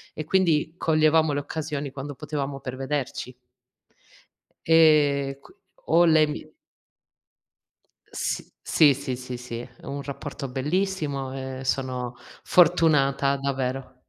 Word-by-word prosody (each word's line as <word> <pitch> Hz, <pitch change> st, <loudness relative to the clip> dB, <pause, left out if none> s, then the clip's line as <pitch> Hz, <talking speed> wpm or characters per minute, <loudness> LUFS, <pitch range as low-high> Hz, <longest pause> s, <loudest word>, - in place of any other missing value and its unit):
e 155 Hz, -, -4 dB
quindi 160 Hz, -2 st, +2 dB
coglievamo 155 Hz, -2 st, +3 dB
le 140 Hz, -, 0 dB
occasioni 145 Hz, -1 st, -4 dB
quando 140 Hz, +1 st, -7 dB
potevamo 140 Hz, -1 st, -4 dB
per 130 Hz, -1 st, -6 dB
vederci 135 Hz, -2 st, -3 dB, 1.3 s
ehm, 150 Hz, -4 st, +4 dB
qu -, -, -18 dB, 0.3 s
o 175 Hz, +1 st, +5 dB
lei 155 Hz, -1 st, +5 dB
mi 150 Hz, -, -5 dB, 1.7 s
S -, -, -2 dB, 0.2 s
sì, 145 Hz, -3 st, +5 dB
sì, 130 Hz, -1 st, -4 dB
sì, 125 Hz, 0 st, -7 dB
sì. 120 Hz, -1 st, -7 dB
È 120 Hz, 0 st, -12 dB
un 140 Hz, +1 st, -5 dB
rapporto 140 Hz, 0 st, -6 dB
bellissimo 145 Hz, -1 st, -2 dB
e 130 Hz, -1 st, -6 dB
sono 125 Hz, -2 st, -2 dB, 0.3 s
fortunata 140 Hz, -5 st, +4 dB
davvero. 135 Hz, -1 st, -3 dB
140 Hz, 115 wpm, -25 LUFS, 130-155 Hz, 1.7 s, o